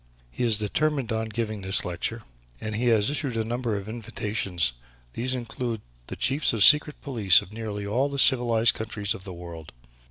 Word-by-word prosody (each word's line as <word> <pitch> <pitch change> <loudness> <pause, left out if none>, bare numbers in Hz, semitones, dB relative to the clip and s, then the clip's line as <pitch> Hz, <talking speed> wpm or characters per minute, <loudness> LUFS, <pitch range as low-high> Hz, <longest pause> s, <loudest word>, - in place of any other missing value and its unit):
He 125 - -4
is 115 -3 +2
determined 135 +5 -1
on 110 0 -2
giving 110 -1 -3
this 95 +1 +4
lecture 90 +6 -3 0.4
and 110 -1 -5
he 120 +3 -1
has 110 +1 +3
issued 140 -5 -3
a 110 - 0
number 120 0 -2
of 100 0 -7
invitations. 105 - -2 0.4
These 130 - -2
include 120 -2 -4 0.3
the - - -6
Chiefs 135 +2 +1
of - - -1
the - - +8
Secret 150 0 +6
Police 110 -10 +3
of 100 - -15
nearly 105 -2 -5
all 125 +8 0
the 140 - -5
civilized 120 -4 +4
countries 105 -2 -3
of 95 - -11
the 95 - -7
world. 85 -2 -10
110 Hz, 190 wpm, -25 LUFS, 105-125 Hz, 0.4 s, the